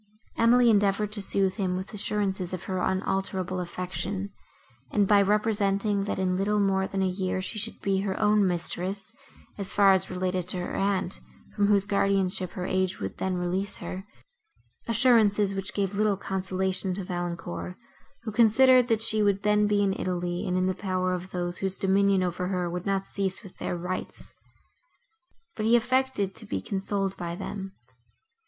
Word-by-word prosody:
Emily 235 +1 +5
endeavoured 205 0 +2
to 210 -1 -3
sooth 195 -1 +1
him 185 -2 -1
with 190 +2 -7
assurances 195 -3 -1
of 185 - -4
her 185 -1 -3
unalterable 190 0 -1
affection, 185 +2 -4 0.6
and 205 -2 +2
by 205 0 +5
representing, 205 -1 +1
that, - - -2
in 185 -1 0
little 210 +2 +1
more 190 -1 +1
than 195 -1 -1
a - - +2
year, 185 0 -2
she 190 +4 -4
should 225 +2 -2
be 195 -1 +1
her 195 -1 -2
own 210 -2 +3
mistress, 185 +2 -2 0.5
as 195 - -5
far 200 -1 +6
as 190 0 +6
related 185 -1 -2
to 185 - +2
her 180 - -4
aunt, 195 -2 -1 0.4
from 205 -1 +2
whose 200 -1 +3
guardianship 195 -2 0
her 180 - -4
age 185 0 0
would 95 -1 -5
then 190 -1 -1
release 185 +3 -2
her; 185 +1 -6 0.8
assurances, 220 -4 +4
which 195 0 -4
gave 200 -1 -1
little 205 -1 +1
consolation 190 0 -2
to 195 - -4
Valancourt, 175 0 -5 0.5
who 220 - -4
considered, 245 +3 +5
that 225 -2 +1
she 215 -1 +2
would 200 -1 +1
then 210 0 +3
be 205 -1 +2
in 195 -1 +1
Italy 175 -2 -3
and 180 0 0
in 185 - +1
the 185 - +1
power 185 -1 -1
of 180 +1 -5
those, 175 -1 -2
whose 190 -1 -1
dominion 195 -1 +3
over 180 0 -2
her 180 -2 -1
would 180 +2 -5
not 195 -1 0
cease 195 +1 -3
with 195 - -12
their 175 - -3
rights; 180 +2 -6 1.2
but - - -3
he 235 - +5
affected 245 -4 +1
to - - -9
be 95 - -2
consoled 195 - -2
by 170 -1 -4
them. 195 +1 -6
195 Hz, 175 wpm, -27 LUFS, 185-205 Hz, 1.2 s, far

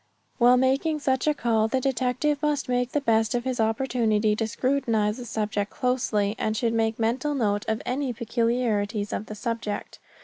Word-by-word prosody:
While 245 +1 +6
making 270 +5 +2
such 265 0 0
a 300 - +4
call 225 -4 +1
the 260 +4 0
detective 270 +3 0
must 295 -2 0
make 250 0 0
the 295 - +1
best 225 -3 +2
of 240 - -1
his 255 -1 -2
opportunity 220 -2 +1
to 225 0 -1
scrutinize 230 -3 0
the 250 - -7
subject 210 -2 -2
closely, 220 -5 0
and 215 0 -1
should 230 0 0
make 225 -1 0
mental 255 +6 0
note 205 -5 0
of 220 0 -1
any 265 +1 -1
peculiarities 230 -3 -1
of 215 - -4
the 215 - -7
subject. 230 -2 -4
235 Hz, 175 wpm, -25 LUFS, 220-260 Hz, -, While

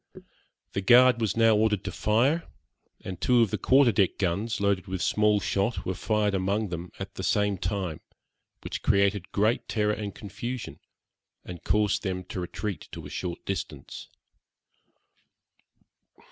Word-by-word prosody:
The 100 - -1
guard 125 +4 +6
was 110 0 0
now 115 -1 +5
ordered 105 -2 +1
to - - -4
fire, 130 +10 +1 0.5
and 95 -1 -7
two 120 +2 +4
of 110 - -1
the - - -2
quarter 130 -2 +5
deck 95 -3 +1
guns, 100 +5 -1
loaded 100 -1 0
with 95 0 -3
small 105 +2 +2
shot, 100 +4 -1
were 95 - -1
fired 105 +1 0
among 100 +2 0
them 85 +1 -5
at 95 0 -7
the 95 - -6
same 105 +2 +1
time, 95 -7 -3 0.6
which - - -5
created 100 -1 +1
great 110 +4 +1
terror 105 -1 +1
and 105 -1 -5
confusion, 110 +4 -6 0.7
and 85 -4 -9
caused 105 +2 +1
them 95 -2 -3
to - - -4
retreat 95 +2 -5
to - - -8
a - - -9
short 90 -2 -5
distance. 95 -3 -6
100 Hz, 150 wpm, -27 LUFS, 95-110 Hz, 0.7 s, guard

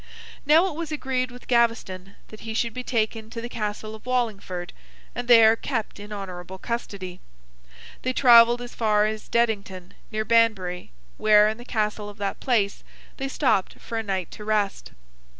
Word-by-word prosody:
Now, 320 +4 +6
it 380 - -2
was 320 +1 -5
agreed 260 -4 -1
with 245 0 -13
Gaveston 230 -6 0
that 215 - -12
he 220 0 -6
should 230 0 0
be 250 - -5
taken 220 -2 -1
to 230 - -6
the 235 - -5
Castle 215 -1 -4
of 220 +3 -12
Wallingford, 200 -8 -2 0.4
and 245 0 -5
there 225 -2 +7
kept 225 -4 -4
in 205 +1 -10
honourable 190 -2 -7
custody. 195 -5 -5 0.8
They 255 - -1
travelled 240 -2 +6
as 245 - -9
far 210 -2 +2
as 215 0 -4
Dedington, 200 -6 -1 0.2
near 215 0 -2
Banbury, 215 -6 +2 0.3
where, 210 -1 +6
in 220 +2 -3
the 240 - -10
Castle 210 -3 -2
of 205 - -12
that 200 -1 -3
place, 215 -6 0 0.3
they 270 - -3
stopped 265 -8 0
for 230 - -8
a 225 - 0
night 190 -5 -3
to 210 - -9
rest. 210 -2 -1
220 Hz, 170 wpm, -25 LUFS, 205-240 Hz, 0.8 s, there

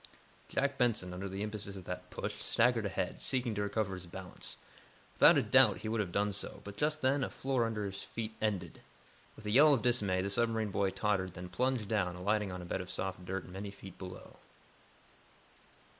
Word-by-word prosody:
Jack 140 0 0
Benson, 110 -7 +1
under 95 +2 -4
the 95 +2 -3
impetus 105 -2 -5
of 95 - -8
that 90 0 -6
push, - - -5
staggered 115 -2 +3
ahead, 95 - -3
seeking 125 -3 0
to 105 - -2
recover 100 -1 -1
his 90 -1 -7
balance. 90 +1 -8 0.6
Without - - +7
a - - +3
doubt - - +6
he - - -4
would 110 +1 0
have 100 -4 -1
done 100 +2 +1
so, 100 - -3
but, 100 -1 -8
just 150 +6 0
then, 135 +2 +3
the - - 0
floor 130 -3 0
under 105 -2 -2
his 95 0 -5
feet 110 -1 -5
ended. 95 -6 -2 0.5
With 110 - -13
a 105 - -1
yell 145 +5 +7
of 115 - -3
dismay, 100 -7 +2
the 100 - -1
submarine 110 -1 +1
boy 100 0 +1
tottered, 95 -3 0
then 90 0 -7
plunged 125 +4 0
down, 95 -5 0
alighting 100 +2 0
on 90 -1 -6
a - - -8
bed 95 - -2
of 90 - -8
soft 95 -1 -3
dirt 95 0 -3
many 95 +3 -6
feet 95 -2 -12
below. 90 -1 -9
100 Hz, 205 wpm, -33 LUFS, 95-115 Hz, 0.6 s, Without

